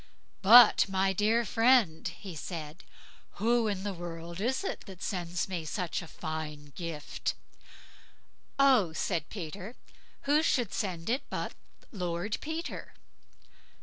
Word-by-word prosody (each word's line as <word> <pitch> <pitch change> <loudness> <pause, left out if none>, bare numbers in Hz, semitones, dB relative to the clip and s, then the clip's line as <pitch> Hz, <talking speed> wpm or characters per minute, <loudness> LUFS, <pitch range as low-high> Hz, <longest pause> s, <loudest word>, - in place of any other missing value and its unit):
"But, 225 0 +8
my 190 0 +2
dear 220 +4 +2
friend", 225 -8 +3
he 190 -5 -8
said, 155 0 -7 0.5
"who 230 +1 +2
in 195 -2 -2
the 205 -1 -2
world 170 0 -7
is 260 - 0
it - - -4
that 190 -2 -10
sends 175 -2 -2
me 180 -4 -3
such 175 +2 -3
a 175 - -9
fine 150 -3 -6
gift?" 165 -4 -4 1.2
"Oh!" 255 -12 +5
said 160 -1 -2
Peter, 195 +4 -7 0.5
"who 295 +2 +3
should 245 - +1
send 185 -7 -3
it 250 +5 +1
but - - -3 0.4
Lord 180 0 -2
Peter." 320 +2 -5
190 Hz, 125 wpm, -30 LUFS, 170-230 Hz, 1.2 s, But